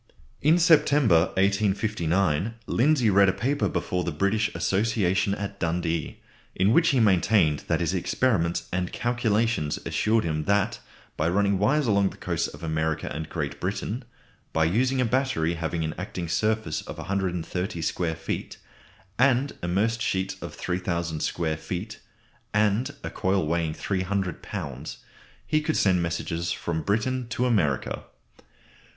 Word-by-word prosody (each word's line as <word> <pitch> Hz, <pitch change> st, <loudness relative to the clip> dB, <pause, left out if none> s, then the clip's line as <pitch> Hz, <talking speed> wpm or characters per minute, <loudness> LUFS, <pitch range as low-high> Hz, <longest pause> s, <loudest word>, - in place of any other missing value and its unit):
In 155 Hz, +4 st, +5 dB
September, 145 Hz, -, +5 dB
1859, 100 Hz, -2 st, +1 dB
Lindsay 130 Hz, -4 st, +3 dB
read 100 Hz, 0 st, +5 dB
a -, -, +1 dB
paper 130 Hz, +9 st, 0 dB
before 90 Hz, 0 st, -1 dB
the 85 Hz, -, -2 dB
British 100 Hz, +7 st, +1 dB
Association 100 Hz, -2 st, +1 dB
at 100 Hz, 0 st, -6 dB
Dundee, 85 Hz, -2 st, -1 dB, 0.4 s
in 95 Hz, +4 st, +3 dB
which 170 Hz, +4 st, +5 dB
he 135 Hz, -5 st, +3 dB
maintained 95 Hz, -6 st, +3 dB
that 85 Hz, 0 st, +1 dB
his 85 Hz, +2 st, 0 dB
experiments 90 Hz, -2 st, 0 dB
and 90 Hz, -1 st, -1 dB
calculations 115 Hz, -8 st, 0 dB
assured 110 Hz, +1 st, +1 dB
him 75 Hz, -2 st, -2 dB
that 100 Hz, -1 st, +1 dB, 0.4 s
by 80 Hz, +2 st, +1 dB
running 100 Hz, +1 st, +2 dB
wires 140 Hz, +9 st, +2 dB
along 100 Hz, -3 st, +3 dB
the -, -, -13 dB
coasts -, -, -1 dB
of -, -, -11 dB
America 80 Hz, -1 st, -1 dB
and 80 Hz, +1 st, -5 dB
Great -, -, -4 dB
Britain, 105 Hz, +6 st, -3 dB, 0.5 s
by 80 Hz, -, +3 dB
using 125 Hz, +10 st, +1 dB
a 125 Hz, -, +3 dB
battery 120 Hz, -9 st, +1 dB
having 85 Hz, 0 st, -2 dB
an 80 Hz, -, -2 dB
acting 90 Hz, -2 st, -4 dB
surface 110 Hz, -1 st, 0 dB
of -, -, -9 dB
130 90 Hz, -1 st, -2 dB
square 80 Hz, -1 st, -1 dB
feet 80 Hz, 0 st, -5 dB, 0.6 s
and 135 Hz, +1 st, +3 dB
immersed 105 Hz, +7 st, 0 dB
sheets 95 Hz, -2 st, -1 dB
of -, -, -7 dB
3000 85 Hz, -3 st, -2 dB
square 80 Hz, -1 st, -1 dB
feet, 90 Hz, +7 st, -5 dB, 0.6 s
and 110 Hz, +7 st, +2 dB
a -, -, -4 dB
coil 95 Hz, -2 st, 0 dB
weighing 80 Hz, 0 st, -1 dB
300 95 Hz, -2 st, -2 dB
lbs., -, -, -6 dB, 0.5 s
he 155 Hz, 0 st, +1 dB
could 155 Hz, +1 st, -1 dB
send 95 Hz, -3 st, +3 dB
messages 85 Hz, 0 st, -2 dB
from 80 Hz, -1 st, -2 dB
Britain 115 Hz, +6 st, -1 dB
to 125 Hz, +1 st, 0 dB
America. 90 Hz, -, 0 dB
95 Hz, 145 wpm, -26 LUFS, 85-110 Hz, 0.6 s, In